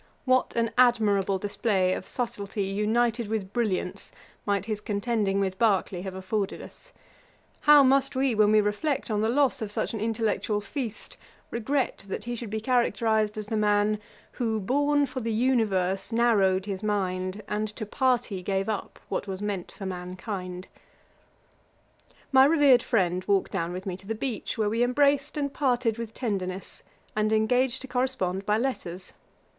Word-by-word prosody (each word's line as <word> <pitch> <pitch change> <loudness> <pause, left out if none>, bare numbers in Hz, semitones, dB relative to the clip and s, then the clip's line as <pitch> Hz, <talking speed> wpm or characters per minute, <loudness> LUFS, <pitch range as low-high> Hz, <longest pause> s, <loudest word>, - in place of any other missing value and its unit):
What 255 -1 +2
an 230 -1 +1
admirable 205 -6 +3
display 195 -1 0
of 185 - -5
subtilty, 205 -4 -3
united 230 +2 +1
with 205 -3 -3
brilliance, 205 -6 -2 0.4
might 200 -1 +1
his 215 -1 -3
contending 205 -2 0
with 190 -1 -1
Berkeley 195 -5 +2
have 190 0 -6
afforded 195 +1 -2
us! - - -13 0.7
How 295 -1 +7
must 275 +1 +3
we, 265 -1 +2
when 210 -1 +4
we 215 0 +6
reflect 215 +6 -1
on 210 -1 +1
the 220 - +1
loss 270 0 +2
of 215 -2 -3
such - - -2
an 220 - -3
intellectual 220 -1 0
feast, 225 +2 -6 0.3
regret 255 +2 -1
that 195 - -4
he 240 +1 -4
should 235 -2 -6
be 220 +1 -2
characterised 220 -3 +1
as 215 - -4
the 220 - -3
man, 210 0 +2 0.3
'Who 225 -3 -1
born 285 +7 +2
for 260 -1 -5
the 230 -2 -2
universe 215 -5 +1
narrow'd 200 -5 +3
his 195 -2 -4
mind, 190 -1 -2
And 210 +1 -1
to 215 - -4
party 245 -4 0
gave 195 +2 -1
up 215 -3 -4
what - - -3
was 190 -1 -4
meant 200 -4 -3
for 195 - -8
mankind?' 185 0 -5 1.6
My 265 -1 +7
revered 285 -5 +5
friend 185 -7 +1
walked 200 -1 +1
down 170 -3 -2
with 185 +1 -6
me 190 -2 -3
to 195 - -15
the 225 - -2
beach, 235 -1 -4
where 215 -2 +1
we 225 +2 0
embraced 280 +3 +2
and 280 -1 -2
parted 245 -5 +1
with 230 -2 -5
tenderness, 190 -5 -4 0.3
and 215 0 +1
engaged 245 +4 +2
to - - -7
correspond 245 -8 -1
by 210 0 +3
letters. 190 -8 -4
215 Hz, 165 wpm, -27 LUFS, 195-245 Hz, 1.6 s, How